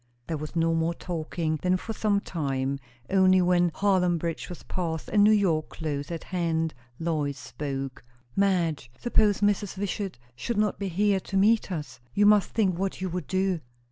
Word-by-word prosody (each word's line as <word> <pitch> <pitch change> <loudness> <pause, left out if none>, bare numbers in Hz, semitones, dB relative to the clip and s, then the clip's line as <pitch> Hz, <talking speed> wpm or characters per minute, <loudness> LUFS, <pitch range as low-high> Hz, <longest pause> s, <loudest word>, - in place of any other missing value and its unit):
There 165 - -2
was 155 +2 -7
no 165 0 +2
more 165 +1 +1
talking 160 -2 -3
then 185 0 +2
for 225 +4 -5
some 205 -2 +1
time. 140 -6 -2 0.3
Only 185 -1 +5
when 175 -1 +3
Haarlem 180 -2 +2
bridge 165 0 -4
was 180 - -8
past 165 -3 -3
and 205 -1 +4
New 210 - +7
York 180 -7 +2
close 145 -3 -4
at 165 -2 -5
hand, 165 -3 -1 0.2
Lois 150 -4 -1
spoke. 135 -2 -5 0.3
"Madge, 175 -9 +1
suppose 210 -4 +2
Mrs. 205 -1 +1
Wishart 195 -3 -3 0.2
should 235 - -3
not 210 0 +1
be 200 - -2
here 195 +2 +2
to 195 +1 -3
meet 210 +1 +3
us? 150 -6 -5 0.2
You 205 - +4
must 210 -1 +5
think 190 -6 +1
what 195 0 -2
you 185 0 -2
would 180 -4 -4
do." 190 -2 +1
180 Hz, 175 wpm, -27 LUFS, 160-195 Hz, 0.3 s, New